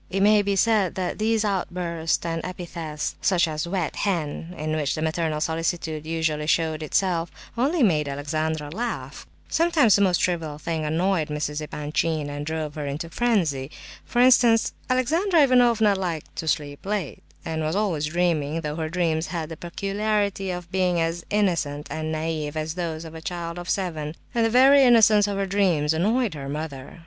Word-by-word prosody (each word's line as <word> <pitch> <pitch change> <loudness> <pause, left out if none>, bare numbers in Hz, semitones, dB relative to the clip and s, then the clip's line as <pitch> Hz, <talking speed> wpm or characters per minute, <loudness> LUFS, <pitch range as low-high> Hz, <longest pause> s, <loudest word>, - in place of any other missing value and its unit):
It 195 +1 -1
may 210 0 +6
be 200 0 0
said 205 -2 +2
that 185 +1 -3
these 220 0 +1
outbursts 175 -4 -1
and 165 -1 -2
epithets, 170 -4 -5
such 180 -2 +3
as 155 +1 -3
"wet 175 -3 -2
hen" 170 -3 -2
(in 155 +1 -2
which 150 -3 0
the 155 - -4
maternal 160 -1 -1
solicitude 160 -1 -2
usually 160 -2 -1
showed 160 -1 +1
itself), 170 +1 0 0.3
only 280 +6 +2
made 155 -8 +2
Alexandra 150 +2 -2
laugh. 235 +7 -5 0.2
Sometimes 320 - +4
the 200 - +2
most 185 -3 +4
trivial 165 -4 -1
thing 160 0 -3
annoyed 165 +1 +1
Mrs. 150 0 -3
Epanchin, 150 0 -2
and 145 +1 -5
drove 155 -2 -3
her 150 -2 -4
into 145 +5 -3
a - - -10
frenzy. 165 - 0 0.3
For - - -7
instance, 240 -3 +5 0.2
Alexandra 320 +7 +3
Ivanovna 240 -5 +4
liked 175 -5 -4
to 160 - -4
sleep 145 -2 -2
late, 200 -7 -3 0.2
and 160 -1 -2
was 155 +2 -1
always 185 -8 0
dreaming, 165 -2 0
though 150 0 -4
her 160 -1 -2
dreams 165 -1 0
had 165 -3 -4
the 165 - -6
peculiarity 200 +3 -1
of 180 -1 -5
being 180 -2 +1
as 165 +1 -1
innocent 165 -8 0
and 155 0 -3
naive 155 -1 -3
as 155 0 -2
those 165 -2 -4
of 160 - -9
a 160 - -8
child 170 0 -5
of 175 - -7
seven; 160 -5 -2 0.2
and 235 -2 +2
the 225 - +3
very 265 +4 +6
innocence 220 -4 +6
of 200 -1 -2
her 195 - 0
dreams 180 -6 +2
annoyed 215 +5 +1
her 140 -2 -6
mother. 145 -1 -6
170 Hz, 175 wpm, -24 LUFS, 155-200 Hz, 0.3 s, may